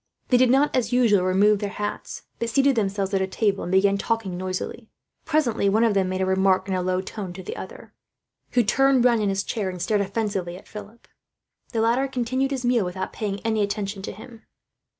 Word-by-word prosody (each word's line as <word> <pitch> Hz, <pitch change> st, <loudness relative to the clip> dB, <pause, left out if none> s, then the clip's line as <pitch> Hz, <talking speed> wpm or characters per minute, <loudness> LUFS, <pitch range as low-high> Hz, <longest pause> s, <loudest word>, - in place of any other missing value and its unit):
They 250 Hz, -, +5 dB
did 255 Hz, 0 st, +4 dB
not, 275 Hz, +4 st, +3 dB
as 250 Hz, -2 st, 0 dB
usual, 235 Hz, -6 st, +4 dB
remove 200 Hz, +3 st, +3 dB
their 205 Hz, -1 st, -3 dB
hats; 205 Hz, +1 st, -5 dB, 0.2 s
but 235 Hz, -, -1 dB
seated 275 Hz, +3 st, +3 dB
themselves 200 Hz, -2 st, -1 dB
at 195 Hz, -, +2 dB
a 190 Hz, -, 0 dB
table, 200 Hz, 0 st, 0 dB
and 180 Hz, -, -4 dB
began 195 Hz, +1 st, +3 dB
talking 225 Hz, -5 st, -2 dB
noisily. 185 Hz, +5 st, -5 dB, 0.4 s
Presently 255 Hz, -10 st, +1 dB
one 220 Hz, +3 st, +3 dB, 0.3 s
made 185 Hz, 0 st, -2 dB
a -, -, +2 dB
remark 190 Hz, 0 st, +2 dB
in 190 Hz, -, -2 dB
a 185 Hz, -, 0 dB
low 185 Hz, 0 st, 0 dB
tone 190 Hz, -2 st, -7 dB
to 185 Hz, +1 st, -9 dB
the -, -, -6 dB
other, -, -, -10 dB, 0.6 s
who 245 Hz, -, +4 dB
turned 265 Hz, +3 st, +3 dB
round 235 Hz, -3 st, +4 dB
in 205 Hz, -, +1 dB
his 195 Hz, 0 st, -1 dB
chair, 205 Hz, -3 st, -2 dB
and 180 Hz, -1 st, -7 dB
stared 205 Hz, +4 st, +1 dB
offensively 195 Hz, -3 st, -2 dB
at -, -, -16 dB
Philip. 210 Hz, +2 st, -11 dB, 0.6 s
The 225 Hz, -3 st, 0 dB
latter 240 Hz, +4 st, +2 dB
continued 260 Hz, +1 st, -1 dB
his 265 Hz, -3 st, -3 dB
meal, 240 Hz, -3 st, +3 dB
without 185 Hz, +1 st, -4 dB
paying 205 Hz, -2 st, -3 dB
any 220 Hz, -2 st, 0 dB
attention 200 Hz, -1 st, -2 dB
to -, -, -5 dB
him. 220 Hz, +3 st, -12 dB
205 Hz, 210 wpm, -24 LUFS, 190-235 Hz, 0.6 s, They